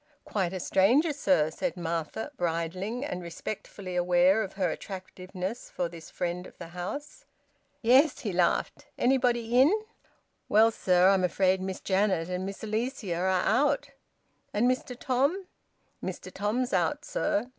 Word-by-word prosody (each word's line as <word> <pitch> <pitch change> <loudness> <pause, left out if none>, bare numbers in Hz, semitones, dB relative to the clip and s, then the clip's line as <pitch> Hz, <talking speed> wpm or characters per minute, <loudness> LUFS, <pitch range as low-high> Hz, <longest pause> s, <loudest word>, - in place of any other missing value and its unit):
"Quite 190 -5 -1
a 190 - -4
stranger, 245 - +3
sir!" 180 - +2
said 265 - -3
Martha, 170 - -3
bridling, 180 - -2
and 180 -9 -4
respectfully 185 +2 -6
aware 180 +3 +4
of 195 -3 -4
her 190 -2 0
attractiveness 185 +2 -6
for 175 - -2
this 165 -1 -11
friend 180 0 -3
of - - -17
the - - -9
house. 285 - -6 0.6
"Yes," 260 +6 +5
he 205 -5 -3
laughed. 175 -1 0
"Anybody 245 -2 +2
in?" 285 +6 +6 0.8
"Well, 220 +2 +6
sir, 185 -3 +4
I'm 195 -1 +3
afraid 185 +1 +2
Miss 190 0 -4
Janet 190 -3 +1
and 180 +1 -2
Miss 195 +2 -7
Alicia 220 -3 -2
are 180 +2 0
out." 280 +10 +2 0.6
"And 225 +4 +3
Mr 255 -1 -1
Tom?" 280 +10 +1 0.6
"Mr - - -6
Tom's 230 +4 -1
out, 235 - +1
sir. 215 +4 0
195 Hz, 145 wpm, -28 LUFS, 180-245 Hz, 0.8 s, in